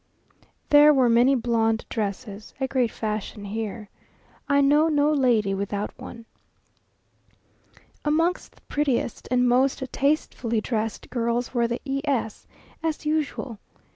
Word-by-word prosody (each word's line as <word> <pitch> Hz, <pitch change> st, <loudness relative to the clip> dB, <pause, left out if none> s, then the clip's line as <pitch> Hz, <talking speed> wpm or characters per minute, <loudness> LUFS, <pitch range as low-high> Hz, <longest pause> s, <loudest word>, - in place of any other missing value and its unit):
There 295 Hz, +1 st, +8 dB
were 255 Hz, -3 st, +4 dB
many 240 Hz, +4 st, +4 dB
blonde 225 Hz, -2 st, 0 dB
dresses, 210 Hz, 0 st, -5 dB
a 265 Hz, -, 0 dB
great 255 Hz, -3 st, +1 dB
fashion 215 Hz, -1 st, -4 dB
here. 210 Hz, 0 st, -5 dB, 0.6 s
I 280 Hz, 0 st, +4 dB
know 295 Hz, +3 st, +4 dB
no 295 Hz, -1 st, +2 dB
lady 235 Hz, -8 st, +2 dB
without 200 Hz, +1 st, -3 dB
one. 230 Hz, -1 st, -10 dB, 1.8 s
Amongst 330 Hz, +4 st, 0 dB
the -, -, -24 dB
prettiest 280 Hz, -6 st, -2 dB
and 250 Hz, 0 st, +2 dB
most 260 Hz, +2 st, +2 dB
tastefully 270 Hz, -5 st, 0 dB
dressed 220 Hz, 0 st, -3 dB
girls 235 Hz, 0 st, -1 dB
were 235 Hz, -2 st, +2 dB
the 235 Hz, +1 st, -4 dB
E 275 Hz, 0 st, -2 dB
s, 255 Hz, -7 st, -2 dB, 0.3 s
as 320 Hz, -1 st, -3 dB
usual. 300 Hz, -7 st, -2 dB
245 Hz, 125 wpm, -24 LUFS, 225-280 Hz, 1.8 s, There